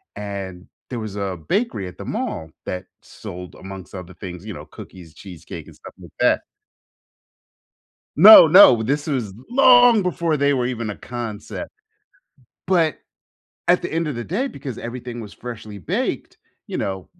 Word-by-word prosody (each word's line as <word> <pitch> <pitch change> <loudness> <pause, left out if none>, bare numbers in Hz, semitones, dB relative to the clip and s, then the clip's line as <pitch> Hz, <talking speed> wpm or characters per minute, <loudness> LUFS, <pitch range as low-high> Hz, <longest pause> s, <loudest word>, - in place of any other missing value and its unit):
and 95 -3 -7 0.2
there 120 -3 -4
was 110 -2 -6
a 100 -3 -3
bakery 205 - -1
at 90 - -11
the - - -8
mall 80 0 -4
that 90 0 -5 0.2
sold 90 0 -10
amongst 95 0 -10
other 90 -1 -9
things, 90 +1 -9
you 110 - -6
know, - - -9
cookies, 85 -4 -13
cheesecake, 90 -4 -10
and - - -14
stuff - - -13
like - - -13
that - - +3 1.8
No. 200 +4 +11
No. 160 - +8
This 145 +7 -1
was 125 -9 -2 0.2
long 245 -3 +6
before 170 -3 0
they 140 0 +2
were 125 -2 0
even 115 -4 -3
a - - -6
concept. 120 - -7 1.0
But, 165 -5 +2 0.7
at 180 - +4
the - - -4
end 165 -1 -1
of 145 - -3
the 120 0 -5
day, 225 - -2
because 135 - -8
everything 120 0 -7
was 105 -2 -10
freshly 110 -4 -8
baked, 90 - -3 0.3
you - - -4
know, 95 -2 -4
115 Hz, 160 wpm, -21 LUFS, 95-155 Hz, 1.8 s, No